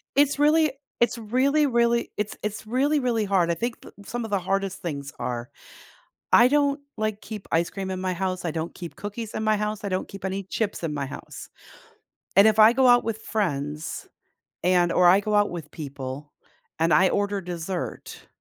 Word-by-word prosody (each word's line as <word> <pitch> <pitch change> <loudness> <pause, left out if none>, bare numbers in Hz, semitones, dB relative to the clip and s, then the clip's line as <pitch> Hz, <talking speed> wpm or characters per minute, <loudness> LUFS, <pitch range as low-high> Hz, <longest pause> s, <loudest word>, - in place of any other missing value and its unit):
It's 285 0 +3
really 305 0 +4 0.3
it's 235 0 +2
really, 260 +7 +2
really 235 -1 +2
it's 210 0 -3
it's 215 +1 -4
really, 280 +6 +1
really 235 -4 0
hard. 185 -4 +2
I - - +2
think 235 +6 -4
p - - -12 0.2
some 240 +2 -4
of 220 - -8
the 200 - +2
hardest 195 +1 -2
things 140 -4 -5
are. 120 -1 -4 0.8
I 240 - +7
don't, 285 0 +2 0.2
like, 215 -1 -2
keep 210 -3 -8
ice 165 +1 +2
cream 190 -1 -5
in 185 - -3
my 185 -1 0
house, 185 0 -3
I 170 - 0
don't 160 +1 -4
keep 170 -3 -8
cookies 210 +2 -6
in 220 - -2
my 215 -1 +3
house, 210 0 -3
I - - -1
don't 185 -1 -2
keep 195 -1 -10
any 195 +1 -3
chips 205 0 -3
in 155 - -1
my 140 -2 -3
house, - - -9 0.9
and 200 +2 +8
if 220 0 +3
I 220 +2 +8
go 260 0 +4
out 245 0 +6
with 220 0 -3
friends, 150 -7 -3 0.6
and 180 -1 +3
or 180 - +4
I 185 +3 +7
go 210 +1 -1
out 205 0 +4
with 165 -4 -7
people 140 -1 -7 0.5
and 165 0 +3
I 185 +4 +5
order 205 -1 0
dessert 175 0 -6
200 Hz, 200 wpm, -25 LUFS, 175-230 Hz, 0.9 s, and